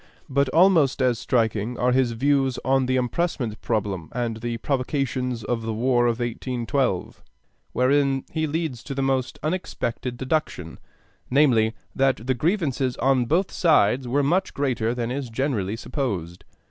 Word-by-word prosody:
But 140 0 +1
almost 160 -3 +4
as 125 -4 +2
striking 115 -1 0
are 125 +1 +2
his 125 -2 +2
views 135 +1 +1
on 135 -1 +2
the 130 - +1
impressment 125 -3 -1
problem 100 -7 -2
and 120 -2 -2
the 120 +1 -3
provocations 130 -2 -1
to 120 - -1
the 115 -1 -4
War 120 +1 +2
of 115 -1 0
1812; 120 -2 -2 0.5
wherein 135 +1 +2
he 160 -1 -1
leads 155 -6 -3
to 140 - -5
the 135 - -1
most 135 -2 0
unexpected 145 -7 -3
deduction, 130 - -2 0.5
namely, 120 -5 +3 0.2
that 135 -4 +1
the 130 - +2
grievances 135 - 0
on 130 -1 +2
both 175 +9 +1
sides 130 - +3
were 140 +4 +1
much 180 +7 0
greater 125 -4 0
than 120 -1 -2
is 135 -1 -3
generally 115 -5 -1
supposed. 100 - -4
130 Hz, 145 wpm, -24 LUFS, 115-140 Hz, 0.5 s, almost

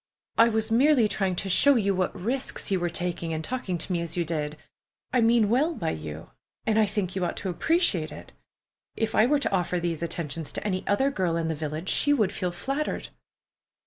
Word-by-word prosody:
"I 230 +1 +7
was 220 0 -1
merely 255 0 +5
trying 195 -3 -1
to 195 - -2
show 280 +9 +5
you 200 -4 +2
what 185 -1 -1
risks 240 +2 -2
you 190 - +2
were 175 0 -1
taking 170 -1 -1
in 160 -1 -3
talking 195 -5 -2
to 175 +3 -2
me 170 - 0
as 170 0 -4
you 170 - +1
did. 150 -2 -3 0.6
I 250 - +4
mean 230 -1 +4
well 285 +10 +2
by 165 - -2
you, 80 0 -7 0.3
and 220 0 +2
I 215 - +4
think 200 -3 -2
you 190 - -1
ought 175 - -2
to 190 - -3
appreciate 195 - +1
it. - - -11 0.6
If 225 -1 -1
I 215 - +5
were 295 +3 +3
to 285 - -1
offer 180 -1 0
these 170 -2 -2
attentions 165 -2 -3
to - - -3
any 185 -3 -1
other 265 +7 +2
girl 180 -8 0
in 165 -1 -1
the - - 0
village, 155 +3 -4
she 290 - +3
would 215 -9 +1
feel 180 -2 -2
flattered." 275 +11 -3
190 Hz, 215 wpm, -26 LUFS, 170-230 Hz, 0.6 s, I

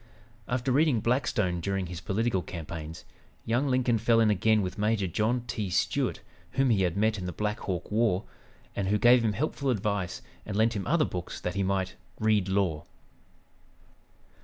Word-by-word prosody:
After 125 +1 -1
reading 140 -2 +3
"Blackstone" 110 -6 0
during 95 +1 -1
his 85 0 -7
political 105 0 0
campaigns, 80 -2 -7 0.4
young 120 +5 +1
Lincoln 125 -3 +2
fell 115 +1 +3
in 110 -2 +4
again 105 +2 +3
with 90 +2 -5
Major 105 -1 +1
John 110 +7 0
T. 110 -4 -3
Stuart, 90 - 0 0.3
whom 135 -2 +3
he 100 -4 +3
had 90 0 0
met 110 0 +2
in 90 - -4
the - - -3
Black 105 +5 -2
Hawk 90 -1 -4
War, 105 -3 +2 0.5
and 100 - -1
who 105 +2 +2
gave 120 +2 +6
him 110 -2 +1
helpful 140 +2 -2
advice 100 -5 -1 0.2
and 105 -1 -4
lent 110 +1 +3
him 100 - -3
other 160 -1 +3
books 90 -1 -5
that 90 - -3
he 100 - -1
might 95 -1 0 0.3
"read 105 -3 +2
law." 95 -6 0
105 Hz, 175 wpm, -28 LUFS, 95-115 Hz, 0.5 s, gave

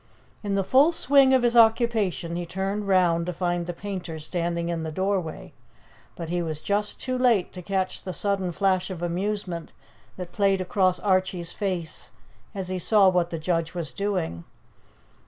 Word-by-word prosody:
In 200 -2 -2
the 195 - +1
full 275 - +5
swing 275 -4 +4
of 260 -2 +4
his 240 0 +2
occupation 220 -7 +3
he 175 - -2
turned 195 +4 -3
round 175 -3 +3
to 180 - -2
find 175 0 -1
the - - -1
painter 180 -3 -6
standing 170 +1 -2
in 170 -1 -2
the 160 0 -4
doorway, 185 -1 -2 0.6
but 165 -1 -6
he 175 0 0
was 160 -2 -3
just 205 +4 -1
too 255 -1 -2
late 235 -8 +2
to 180 - -7
catch 190 +1 -2
the 185 - -5
sudden 195 -1 0
flash 185 +1 +1
of 175 -2 -6
amusement 180 -1 -3 0.4
that 180 -1 -7
played 195 -1 +2
across 185 0 +1
Archie's 185 -2 0
face 180 -6 -4 0.5
as 190 -2 -4
he 185 0 -2
saw 200 +1 +5
what 180 -2 +1
the 165 - -4
judge 165 +1 -1
was 165 -6 -3
doing. 175 - -2
185 Hz, 175 wpm, -25 LUFS, 170-200 Hz, 0.6 s, full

